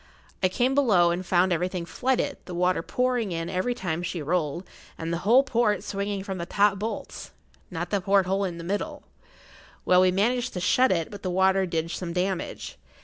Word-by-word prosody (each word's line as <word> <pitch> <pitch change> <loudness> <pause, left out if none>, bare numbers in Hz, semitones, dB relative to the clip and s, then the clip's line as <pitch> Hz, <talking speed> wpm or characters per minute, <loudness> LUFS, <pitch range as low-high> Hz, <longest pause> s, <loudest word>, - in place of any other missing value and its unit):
I 185 - +3
came 245 +7 +1
below 205 -12 +4
and 175 +2 -2
found 180 0 +2
everything 180 +1 -2
flooded, 260 +10 -1
the 180 - -7
water 180 0 +1
pouring 245 0 -1
in 165 0 -3
every 190 +7 -1
time 175 -6 -3
she 175 0 -4
rolled, 170 +2 -2 0.3
and 165 +1 -3
the 170 - -1
whole 255 +4 +7
port 225 -7 +1
swinging 200 -1 -3
from 190 -2 -5
the 170 - -4
top 205 -1 +2
bolts—not 180 -4 -7
the 200 -2 +1
porthole 195 0 +2
in 175 -3 -3
the 170 - -7
middle. 200 +4 -3 0.8
Well, 180 0 +5
we 185 - +5
managed 240 +6 0
to 180 - -3
shut 255 +8 +3
it, 165 -3 -1
but 200 -1 -9
the 185 - -3
water 190 +1 +2
did 165 -1 -2
some 175 -2 -4
damage. 185 +1 -3
185 Hz, 190 wpm, -26 LUFS, 175-205 Hz, 0.8 s, whole